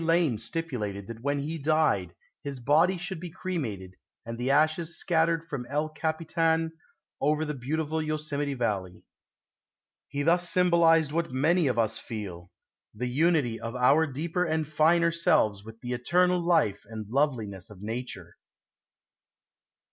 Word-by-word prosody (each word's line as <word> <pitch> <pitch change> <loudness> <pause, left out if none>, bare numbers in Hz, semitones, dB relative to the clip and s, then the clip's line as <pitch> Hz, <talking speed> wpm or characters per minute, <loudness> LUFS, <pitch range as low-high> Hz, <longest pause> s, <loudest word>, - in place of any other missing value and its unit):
Lane 165 -8 +2
stipulated 110 -6 -4
that 115 +2 -9
when 140 +2 0
he 160 +3 -4
died 150 - +1 0.3
his 140 -2 -5
body 155 +9 +3
should 180 0 -5
be 175 +1 -6
cremated 130 - -4 0.3
and 115 0 -5
the 120 +2 -2
ashes 155 +4 +2
scattered 165 -1 +1
from 135 -6 -5
El 150 +2 -1
Capitan 160 +1 0 0.5
over 150 +2 +2
the 150 - -3
beautiful 155 +4 -2
Yosemite 150 -2 -2
Valley. 100 -7 -2 1.0
He 140 0 -3
thus 175 +2 +3
symbolized 170 -4 +4
what 165 +1 -1
many 155 +5 +2
of 125 -3 0
us 115 -2 +1
feel 95 -6 -7 0.5
the 120 +4 -3
unity 140 -4 +2
of 115 +1 -5
our 140 +6 +4
deeper 160 +6 -2
and 160 -3 -1
finer 165 +3 +3
selves 110 -11 +2
with 110 +1 -12
the 125 -1 -3
eternal 180 +9 +2
life 170 - +2
and 110 -1 -7
loveliness 115 -7 -1
of 105 -2 -12
nature. 120 +4 -6
150 Hz, 140 wpm, -28 LUFS, 115-165 Hz, 1.0 s, symbolized